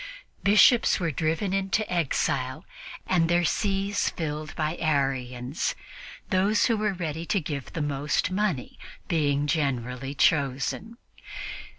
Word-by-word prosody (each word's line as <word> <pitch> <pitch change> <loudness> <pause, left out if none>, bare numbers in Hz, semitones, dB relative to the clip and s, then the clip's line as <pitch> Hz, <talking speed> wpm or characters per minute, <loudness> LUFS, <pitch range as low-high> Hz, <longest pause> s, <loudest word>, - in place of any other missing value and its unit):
Bishops 215 +4 +5
were 170 -3 0
driven 165 +6 -1
into 195 +2 0
exile 145 -3 -1 0.4
and 165 -3 +2
their 175 0 +3
sees 200 +3 0
filled 155 -1 -5
by 155 +1 -1
Arians, 135 -3 -1 0.6
those 200 +3 +3
who 230 - +2
were 210 -1 0
ready 165 -3 -4
to 200 - +2
give 145 -4 -5
the 160 - -2
most 145 +4 0
money 185 -9 -1 0.3
being 145 -4 +1
generally 135 -3 -1
chosen. 140 - +1
160 Hz, 115 wpm, -26 LUFS, 140-190 Hz, 0.6 s, Bishops